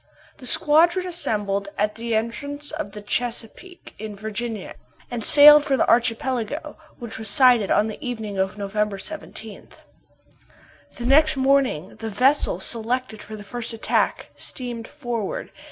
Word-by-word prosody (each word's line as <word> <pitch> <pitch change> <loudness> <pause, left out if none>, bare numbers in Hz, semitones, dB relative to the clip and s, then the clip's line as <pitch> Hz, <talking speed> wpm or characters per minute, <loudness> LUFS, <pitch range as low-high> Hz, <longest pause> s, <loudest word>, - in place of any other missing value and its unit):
The 255 - -6
squadron 340 +7 +4
assembled 205 - -1
at 210 +1 0
the 230 0 -3
entrance 285 +6 -3
to 310 - -3
the 210 +1 -10
Chesapeake, 240 - -4
in 215 -1 -6
Virginia, 220 +1 -5 0.4
and 240 -2 -4
sailed 295 +3 +9
for 275 -2 0
the - - +1
archipelago, 240 +3 0 0.2
which 235 -3 -8
was 220 - -1
sighted 245 -3 +5
on 210 - +3
the 220 +7 -7
evening 220 -6 -4
of 190 +1 -1
November 205 0 -2
17. 220 -3 -6 1.3
The 240 - -6
next 305 +3 +4
morning 265 - +1
the 225 - -5
vessel 255 - +2
selected 230 +2 -2
for 215 - -9
the 210 - -10
first 235 +3 -4
attack, 225 - -1
steamed 240 -3 -5
forward. 240 -8 -5
235 Hz, 140 wpm, -23 LUFS, 210-275 Hz, 1.3 s, sailed